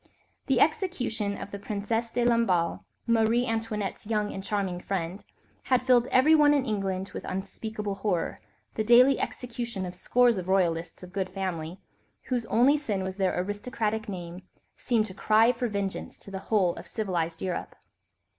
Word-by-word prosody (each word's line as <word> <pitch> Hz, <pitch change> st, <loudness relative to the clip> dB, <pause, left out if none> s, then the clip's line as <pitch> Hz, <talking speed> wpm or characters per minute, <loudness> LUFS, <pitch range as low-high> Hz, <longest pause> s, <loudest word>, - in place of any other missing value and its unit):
The 265 Hz, -4 st, +3 dB
execution 250 Hz, -, 0 dB
of 205 Hz, -, -8 dB
the 200 Hz, -, -6 dB
Princesse 220 Hz, +3 st, -2 dB
de 245 Hz, 0 st, 0 dB
Lamballe, 230 Hz, -8 st, +2 dB, 0.3 s
Marie 230 Hz, +1 st, +3 dB
Antoinette's 220 Hz, -4 st, -3 dB
young 210 Hz, -2 st, 0 dB
and 195 Hz, -, -6 dB
charming 195 Hz, -3 st, -2 dB
friend, 185 Hz, 0 st, -3 dB, 0.4 s
had 255 Hz, -1 st, +2 dB
filled 250 Hz, -1 st, +4 dB
everyone 295 Hz, +3 st, +5 dB
in 275 Hz, -2 st, +1 dB
England 195 Hz, -4 st, -2 dB
with -, -, -6 dB
unspeakable 210 Hz, +2 st, -4 dB
horror, 185 Hz, -5 st, -1 dB, 0.3 s
the 220 Hz, -, -1 dB
daily 250 Hz, +4 st, +6 dB
execution 235 Hz, -5 st, -4 dB
of 180 Hz, -, -6 dB
scores 240 Hz, +3 st, +3 dB
of 180 Hz, -, -6 dB
royalists 170 Hz, -3 st, 0 dB
of 180 Hz, 0 st, -11 dB
good 190 Hz, -2 st, -2 dB
family, 185 Hz, -2 st, -4 dB, 0.5 s
whose 245 Hz, -3 st, -1 dB
only 255 Hz, +7 st, +4 dB
sin 210 Hz, -10 st, -2 dB
was 190 Hz, 0 st, -5 dB
their 190 Hz, -2 st, +1 dB
aristocratic 215 Hz, +2 st, -2 dB
name, 175 Hz, -2 st, -6 dB, 0.3 s
seemed 230 Hz, -4 st, +1 dB
to 195 Hz, -, -9 dB
cry 220 Hz, +4 st, +4 dB
for 245 Hz, 0 st, -2 dB
vengeance 200 Hz, -3 st, -4 dB
to 200 Hz, -, -12 dB
the 190 Hz, -, -4 dB
whole 190 Hz, -6 st, +3 dB
of -, -, -9 dB
civilised 170 Hz, -6 st, -2 dB
Europe. 185 Hz, -2 st, -3 dB
210 Hz, 160 wpm, -28 LUFS, 190-235 Hz, 0.5 s, daily